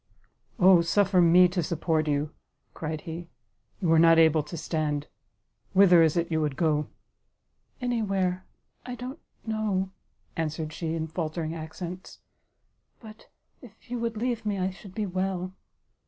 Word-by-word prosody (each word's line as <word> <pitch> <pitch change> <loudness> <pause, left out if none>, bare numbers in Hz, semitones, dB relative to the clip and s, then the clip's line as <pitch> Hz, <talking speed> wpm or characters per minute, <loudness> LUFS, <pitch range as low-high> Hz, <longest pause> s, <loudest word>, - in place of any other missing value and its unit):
"O 185 -1 +7
suffer 185 +2 +3
me 175 +2 +7
to 180 0 -1
support 160 -1 0
you," 145 +1 0 0.4
cried 155 -1 -4
he; 170 0 -7 0.5
"you 170 -4 +1
are 165 - +6
not 165 0 +6
able 160 -1 +5
to 150 +3 -8
stand, 150 -2 -2 0.7
whither 185 -3 +7
is 160 0 +3
it 170 0 -1
you 160 -1 +1
would 150 -3 -1
go?" 150 -1 +1 0.9
"Any 245 -2 -1
where, 185 -3 -1 0.4
I 250 0 -6
don't 255 +5 -7 0.3
know, 210 -4 -1 0.2
" - - -41
answered 155 -1 -3
she, 165 -1 -3
in 160 -1 -2
faltering 160 0 -3
accents, 170 +3 -7 0.8
"but 215 -1 -13 0.3
if 235 -1 -17
you 245 - -2
would 230 -1 -2
leave 235 0 -1
me, 205 -2 -1
I 185 0 -1
should 190 0 -13
be 215 - -1
well." 185 -1 -2
175 Hz, 155 wpm, -27 LUFS, 160-195 Hz, 0.9 s, O